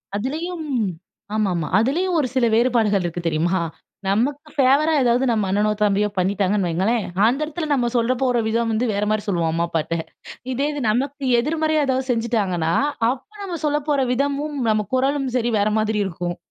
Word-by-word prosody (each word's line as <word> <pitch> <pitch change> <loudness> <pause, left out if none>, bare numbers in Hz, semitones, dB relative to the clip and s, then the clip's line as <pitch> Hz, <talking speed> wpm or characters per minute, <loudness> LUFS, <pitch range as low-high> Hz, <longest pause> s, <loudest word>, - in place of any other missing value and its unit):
அதுலயும் 315 - -3 0.7
ஆமா, 215 -3 +1
ஆமா. 160 -3 -2
அதிலயும் 335 - +1
ஒரு 265 - +1
சில 250 -2 +3
வேறுபாடுகள் 225 -5 +2
இருக்கு 175 0 -3
தெரியுமா? 170 +4 +1 0.5
நமக்கு 275 +10 0
ஃபேவரா 280 +4 +4
ஏதாவது 245 +2 +2
நம்ம 215 -3 +1
அண்ணனோ, 205 +2 +2
தம்பியோ 205 0 +2
பண்ணிட்டாங்கன்னு 195 0 +1
வையுங்களேன், 195 +7 0 0.2
அந்த 260 +5 +1
இடத்துல 310 +1 -4
நம்ம 245 -3 +1
சொல்ல 235 +2 +2
போற 245 -3 +2
விதம் 230 0 0
வந்து 225 +3 0
வேறமாரி 210 +1 0
சொல்லுவோம், 170 -4 0
அம்மா 170 +1 +1
அப்பாட்ட. 165 +1 -1 0.6
இதே 280 +4 0
இது 290 - -4
நமக்கு 275 +5 -1
எதிர்மறையா 310 +2 +1
எதாவது 260 0 -1
செஞ்சுட்டாங்கன்னா, 205 -8 0 0.4
அப்போ 265 - -5
நம்ம 360 -3 -4
சொல்ல 295 0 +1
போற 280 -2 +2
விதமும், 285 +3 -1
நம்ம 215 -1 +1
குரலும் 270 +1 +1
சரி 240 -1 0
வேற 205 +1 +2
மாதிரி 215 0 0
இருக்கும். 175 -1 -4
235 Hz, 165 wpm, -21 LUFS, 200-280 Hz, 0.7 s, ஃபேவரா